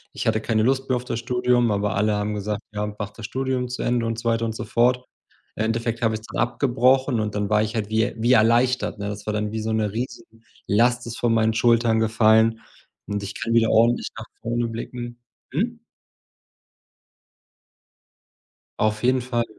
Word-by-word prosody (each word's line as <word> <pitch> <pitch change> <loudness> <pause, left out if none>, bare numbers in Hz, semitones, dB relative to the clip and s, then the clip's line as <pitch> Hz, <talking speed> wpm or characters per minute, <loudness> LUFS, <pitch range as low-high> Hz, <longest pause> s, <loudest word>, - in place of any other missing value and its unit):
Ich - - -3
hatte 110 0 +2
keine 110 -1 +1
Lust 135 +1 +1
mehr 130 - +3
auf 125 0 -4
das 115 - -3
Studium, 125 -1 +1
aber 100 0 0
alle 105 +1 +2
haben 105 +1 -2
gesagt: 105 0 -3
„Ja, 105 0 -2
mach 105 0 -5
das 110 +1 -9
Studium 130 +1 -2
zu 125 - -5
Ende“, 120 -1 +1
und 115 0 -2
so 115 0 -1
weiter 115 0 +1
und 110 -1 -3
so - - -4
fort. 125 +1 +2 0.5
Endeffekt 115 +1 -1
habe 110 -1 +2
ich's 110 0 -8
dann - - -5
abgebrochen 130 +1 +2
und 105 -1 -2
dann 105 0 -1
war 105 0 +3
ich 110 - -3
halt 105 -2 -2
wie 110 +1 +2
er - - -2
wie 120 +3 +4
erleichtert, 120 0 +3
ne? 100 0 -3
Das 105 0 -7
war 105 - -2
dann 105 0 -2
wie: 110 0 -3
So 110 +1 -2
'ne 105 -2 0
Riesenlast 115 0 -2
ist 115 - -6
von 120 -1 +2
meinen 110 0 +2
Schultern 115 -1 +3
gefallen 110 0 +3 0.5
und 105 -1 -3
ich 100 - -6
kann 115 -1 -2
wieder 115 -1 +4
ordentlich 115 +2 +3
nach 110 - -7 0.2
vorne 120 0 -1
blicken. 120 +1 -7 0.3
Hm? 230 - -1 3.0
Auf 110 0 +1
jeden 130 +1 +3
Fall, 120 -1 -1
115 Hz, 195 wpm, -23 LUFS, 110-120 Hz, 3.0 s, wie